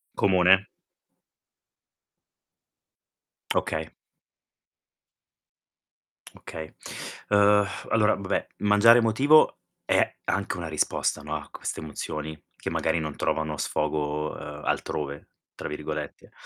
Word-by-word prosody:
Comune? 95 +1 +4 2.9
Okay. - - -1 2.5
Okay. 80 -1 -8 0.6
Ehm, 105 0 +5 0.2
allora, 110 -1 +4
vabbè, 100 -1 -2
mangiare 105 +3 +6
emotivo 130 +7 +5 0.3
è - - +2
anche 100 -2 -1
una 85 -2 -4
risposta, 75 -1 0
no, 75 +1 -4
a 75 -1 -6
queste - - -5
emozioni 75 0 -5 0.2
che - - -5
magari 85 - 0
non 75 -2 -4
trovano 80 -1 -1
sfogo, 75 +1 -1
ehm, - - -8
"altrove" 70 -1 -3 0.3
tra - - -6
virgolette. 75 - -6
85 Hz, 90 wpm, -26 LUFS, 75-105 Hz, 2.9 s, mangiare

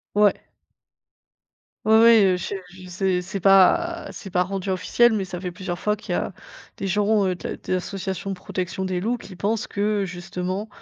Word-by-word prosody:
Ouais. 205 -1 +4 1.5
Oui, 220 - +4
oui, 230 -3 +7
heu 185 -1 +3
je 190 +3 -4 0.2
je 185 -1 -12
c'est 185 0 0
c'est 195 +3 -5
pas 200 - +4
c'est 195 0 -9
pas 180 0 +2
rendu 195 0 -4
officiel, 235 +5 +3
mais 205 -3 0
ça 185 -1 -6
fait 180 0 -4
plusieurs 175 -1 -5
fois 210 0 +1
qu'il 215 - -9
y - - +1
a - - -2 0.4
des 195 - -4
gens, 205 +2 +2
heu, 185 -1 0
de - - -7
la - - -4
des - - -4
associations 190 +1 -4
de - - -3
protection 185 +1 -4
des 185 -1 -1
loups 230 +6 0
qui 185 -5 -12
pensent 215 +2 -1
que, 205 0 0
justement, 185 +3 -4
195 Hz, 200 wpm, -23 LUFS, 185-210 Hz, 1.5 s, oui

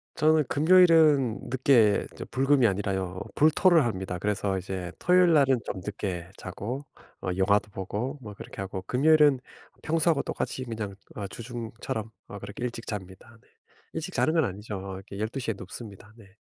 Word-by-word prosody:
저는 155 -1 +3
금요일은 155 -6 +5
늦게 120 -5 +3
저 - - -7
불금이 135 0 +3
아니라요 95 -3 -1 0.2
불토를 160 +1 +5
합니다. 95 -5 -3
그래서 100 0 -1
이제 95 -1 -5
토요일 180 -1 +4
날은 135 -4 +4
좀 95 - -4
늦게 95 -4 -4
자고 115 +9 -6 0.4
어 - - -3
영화도 100 +2 +2
보고 105 +9 -4
뭐 105 -4 -8
그렇게 100 - -9
하고 95 -1 -5
금요일은 145 +4 +4 0.4
평소하고 165 -1 +2
똑같이 130 - -3
그냥 110 -4 -5 0.2
어 100 -2 -4
주중처럼 115 0 -6 0.2
어 100 - -8
그렇게 100 +4 -8
일찍 120 -1 -5
잡니다, 105 +2 -8
네. - - -29 0.5
일찍 160 +3 -5
자는 155 - +2
건 165 -1 +3
아니죠. 105 0 -5 0.2
이렇게 100 +1 -9
12:00 115 +3 -2
에 - - -2
눕습니다, 105 +1 -10
네. 100 -2 -18
115 Hz, 340 characters per minute, -27 LUFS, 100-140 Hz, 0.5 s, 금요일은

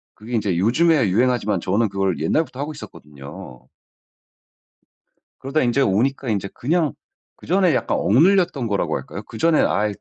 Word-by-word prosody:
그게 110 +3 -11
인제 105 -6 0
요즘에 135 - +3
유행하지만 110 -3 +1
저는 105 +6 0
그걸 95 -2 -1
옛날부터 135 - -1
하고 150 +2 -4
있었거든요. 70 - -12 1.7
그러다 140 +3 -1
인제 125 +3 +1
오니까 130 +4 0
인제 100 -3 -1
그냥 155 +3 0 0.4
그전에 185 -1 +1
약간 - - 0
억눌렸던 170 - +2
거라고 105 -3 -1
할까요? 100 - -7
그 110 - -9
전에 165 +2 +3
"아이 105 0 0
120 Hz, 355 characters per minute, -21 LUFS, 100-150 Hz, 1.7 s, 요즘에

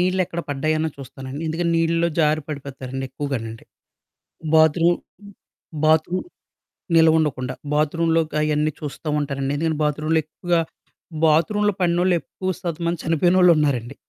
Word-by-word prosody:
నీళ్ళెక్కడ 185 -1 0
పడ్డాయో 155 +3 0
అని 160 0 -1
చూస్తానండి. 135 +2 -8
ఎందుకంటే 170 +2 -1
నీళ్లలో 165 +1 +2
జారి 155 0 +2
పడిపోతారండి 135 -2 -6
ఎక్కువగానండి. 125 -5 -5 0.9
బాత్రూమ్, 165 +2 +4 0.9
బాత్రూమ్ 160 +3 +2 0.7
నిల్వ 160 -1 +6
ఉండకుండా 130 -5 -1 0.2
బాత్రూమ్‌లో 165 +2 +2
క - - -9
అయన్నీ 150 0 +1
చూస్తూ 150 +1 -6
ఉంటానండి. 140 -1 -2
ఎందుకంటే 160 0 -1
బాత్రూమ్‌లో 150 +2 +1
ఎక్కువగా 170 +2 -1 0.6
బాత్రూమ్‌లో 205 +7 +3
పడినోళ్లు, 175 +1 +2
ఎక్కువ 185 0 -5
శాతం 170 -2 -4
మంది 170 -1 -1
చనిపోయినోళ్లున్నారండి. 160 -7 +3
155 Hz, 115 wpm, -22 LUFS, 145-170 Hz, 0.9 s, నిల్వ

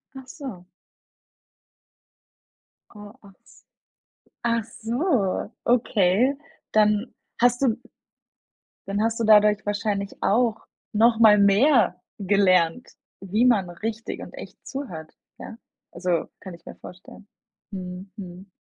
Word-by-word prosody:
Ach 265 -1 -10
so. 255 - -9 2.3
Oh, 205 0 -12
ach 195 - -16
s - - -22 0.8
ach 230 -1 +1
so. 230 - -1
Okay, 235 +1 +2 0.4
dann 210 +1 +2 0.3
hast 245 +1 +3
du 245 -5 +2 1.1
Dann 200 +1 -1
hast 225 +1 0
du 230 - 0
dadurch 210 -1 +5
wahrscheinlich 205 -1 -2
auch 225 +1 +2 0.3
noch 225 +1 +3
mal 215 -2 +7
mehr 220 +7 +4 0.2
gelernt, 190 +1 +2 0.3
wie 210 +6 +1
man 205 -7 +3
richtig 220 +6 -5
und - - -10
echt - - -12
zuhört, 180 - -7 0.3
ja? 225 - -9 0.3
Also, 175 -1 -1
kann 190 - -10
ich 170 0 -15
mir - - -10
vorstellen. 185 +3 -14 0.4
Mhm, 185 0 -8
mhm. 185 0 -10
210 Hz, 115 wpm, -24 LUFS, 190-230 Hz, 2.3 s, mal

